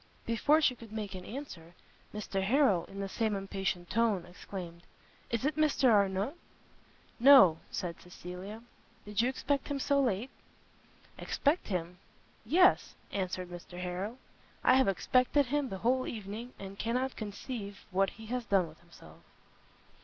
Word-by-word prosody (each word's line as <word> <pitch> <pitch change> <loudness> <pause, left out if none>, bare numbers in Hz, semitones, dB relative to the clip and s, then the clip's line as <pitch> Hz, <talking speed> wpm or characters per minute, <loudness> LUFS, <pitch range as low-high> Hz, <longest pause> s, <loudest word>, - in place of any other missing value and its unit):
Before 290 +7 +3
she 275 - +4
could 230 -3 -13
make 210 -3 -4
an 185 -1 -7
answer, 185 - -8 0.4
Mr 205 -2 -3
Harrel, 205 - +3
in 195 - -10
the 195 - -2
same 220 +1 -1
impatient 195 -2 -3
tone, 220 -6 +2
exclaimed, 175 -1 -8 0.5
"Is 235 +2 -1
it 300 - +1
Mr 300 -5 +3
Arnott?" 200 +4 +2 0.9
"No;" 240 - +8
said 175 -2 -4
Cecilia, 180 +5 -9 0.4
"did 210 +1 0
you 245 - +2
expect 275 +1 -1
him 285 - -2
so 280 +1 +2
late?" 235 -1 0 0.9
"Expect 305 +5 0
him? 180 -2 -3 0.4
Yes," 365 +3 +4 0.2
answered 185 -2 -3
Mr 175 0 -9
Harrel, 180 +6 -4 0.5
"I - - +6
have 260 -2 +5
expected 255 +8 +3
him 285 +1 -1
the 195 - -4
whole 255 +1 +2
evening, 220 +3 -6
and 195 0 -9
cannot 250 +3 -1
conceive 205 -1 -6
what 195 +1 +2
he 220 - -12
has 245 +1 -3
done 195 -4 +2
with 155 0 -15
himself." 80 - -16
210 Hz, 145 wpm, -31 LUFS, 185-255 Hz, 0.9 s, No